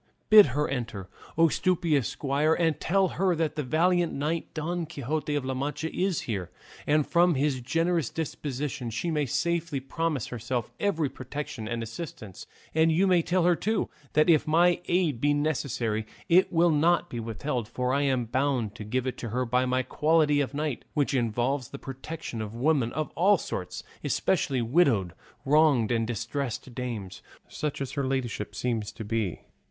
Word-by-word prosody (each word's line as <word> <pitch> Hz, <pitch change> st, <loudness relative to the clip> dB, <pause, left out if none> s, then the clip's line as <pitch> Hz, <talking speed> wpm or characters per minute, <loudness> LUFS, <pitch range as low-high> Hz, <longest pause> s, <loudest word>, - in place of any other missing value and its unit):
Bid 215 Hz, -4 st, +10 dB
her 150 Hz, -, +2 dB
enter, 115 Hz, -8 st, -4 dB, 0.3 s
O 165 Hz, 0 st, +6 dB
stupendous 165 Hz, -5 st, +1 dB
squire, 145 Hz, +3 st, +1 dB
and 160 Hz, -3 st, +1 dB
tell 195 Hz, +2 st, +2 dB
her 185 Hz, -1 st, +1 dB
that 155 Hz, -2 st, -1 dB
the 150 Hz, -, -1 dB
valiant 170 Hz, +5 st, +2 dB
knight 155 Hz, +4 st, -2 dB
Don 165 Hz, +1 st, -2 dB
Quixote 150 Hz, 0 st, -3 dB
of 145 Hz, -3 st, -1 dB
La 130 Hz, -, -1 dB
Mancha 145 Hz, +4 st, -3 dB
is 185 Hz, -4 st, 0 dB
here, 95 Hz, -7 st, -4 dB, 0.4 s
and 150 Hz, 0 st, +3 dB
from 175 Hz, -1 st, +3 dB
his 135 Hz, -1 st, 0 dB
generous 165 Hz, +2 st, 0 dB
disposition 145 Hz, -4 st, -4 dB
she 165 Hz, +10 st, -2 dB
may 150 Hz, -3 st, 0 dB
safely 165 Hz, +1 st, -1 dB
promise 150 Hz, 0 st, -2 dB
herself 120 Hz, 0 st, -3 dB
every 165 Hz, -7 st, +1 dB
protection 130 Hz, -4 st, -6 dB
and 115 Hz, 0 st, -3 dB
assistance; 115 Hz, -, -8 dB, 0.3 s
and 160 Hz, +1 st, +4 dB
you 175 Hz, +5 st, +3 dB
may 180 Hz, -3 st, +4 dB
tell 180 Hz, +2 st, +1 dB
her, 175 Hz, 0 st, +4 dB
too, 220 Hz, +5 st, -1 dB, 0.2 s
that 155 Hz, 0 st, +4 dB
if 160 Hz, -4 st, +4 dB
my 170 Hz, +3 st, +4 dB
aid 170 Hz, -9 st, +1 dB
be 145 Hz, 0 st, +3 dB
necessary 125 Hz, -7 st, -1 dB, 0.2 s
it 180 Hz, +3 st, +4 dB
will 170 Hz, -1 st, +4 dB
not 170 Hz, +3 st, +3 dB
be 120 Hz, -, -5 dB
withheld, 115 Hz, +1 st, -3 dB
for 125 Hz, +2 st, -1 dB
I 140 Hz, -, +2 dB
am 130 Hz, -4 st, +1 dB
bound 125 Hz, -3 st, 0 dB
to -, -, -6 dB
give 125 Hz, +4 st, -2 dB
it 130 Hz, -, -3 dB
to 120 Hz, -, -4 dB
her 125 Hz, +3 st, -1 dB
by 125 Hz, +2 st, +1 dB
my 130 Hz, +1 st, +1 dB
quality 150 Hz, 0 st, +2 dB
of 140 Hz, 0 st, -3 dB
knight, 150 Hz, -3 st, -2 dB
which 145 Hz, -1 st, +1 dB
involves 125 Hz, +2 st, 0 dB
the 140 Hz, -, -7 dB
protection 135 Hz, -2 st, -6 dB
of 110 Hz, +1 st, -6 dB
women 130 Hz, -2 st, +1 dB
of 155 Hz, +1 st, -3 dB
all 195 Hz, +3 st, +4 dB
sorts, 90 Hz, -, -5 dB, 0.2 s
especially 130 Hz, -3 st, +1 dB
widowed, 115 Hz, -, +2 dB, 0.3 s
wronged, 145 Hz, -6 st, +4 dB
and 115 Hz, -1 st, +1 dB
distressed 120 Hz, +2 st, -4 dB
dames, 115 Hz, -7 st, -5 dB, 0.3 s
such 150 Hz, -2 st, -4 dB
as 135 Hz, -2 st, -3 dB
her 140 Hz, -, -2 dB
ladyship 125 Hz, -5 st, -3 dB
seems 115 Hz, -4 st, -2 dB
to 110 Hz, -, -7 dB
be." 105 Hz, -5 st, -2 dB
140 Hz, 175 wpm, -27 LUFS, 120-160 Hz, 0.4 s, Bid